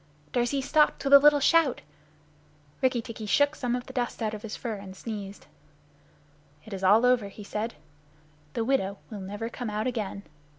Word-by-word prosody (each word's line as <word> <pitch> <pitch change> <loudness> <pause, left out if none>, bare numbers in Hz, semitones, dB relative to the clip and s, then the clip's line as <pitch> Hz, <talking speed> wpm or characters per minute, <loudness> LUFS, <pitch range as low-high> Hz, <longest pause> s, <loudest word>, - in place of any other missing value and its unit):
Darzee 245 +3 0
stopped 300 +2 +2
with 275 0 +2
a 280 - +12
little 295 0 +6
shout. 330 +4 +3 1.0
Rikki 255 -3 +1
tikki 225 -3 -7
shook 285 +7 +3
some 245 -5 -2
of 250 - -5
the - - -11
dust 245 -2 -2
out 215 -1 -1
of 210 - -6
his 215 -1 -6
fur 235 -3 -4
and 195 -1 -10
sneezed. 205 -3 -7 1.2
"It 220 - -9
is 190 0 -6
all 210 +6 +5
over," 250 -4 +3
he 200 +1 -11
said. 215 +3 -4 0.8
"The 225 - -1
widow 200 -7 0
will 205 -2 -6
never 205 +4 -5
come 235 0 -5
out 210 +1 -2
again." 215 -5 -3
230 Hz, 180 wpm, -27 LUFS, 205-255 Hz, 1.2 s, a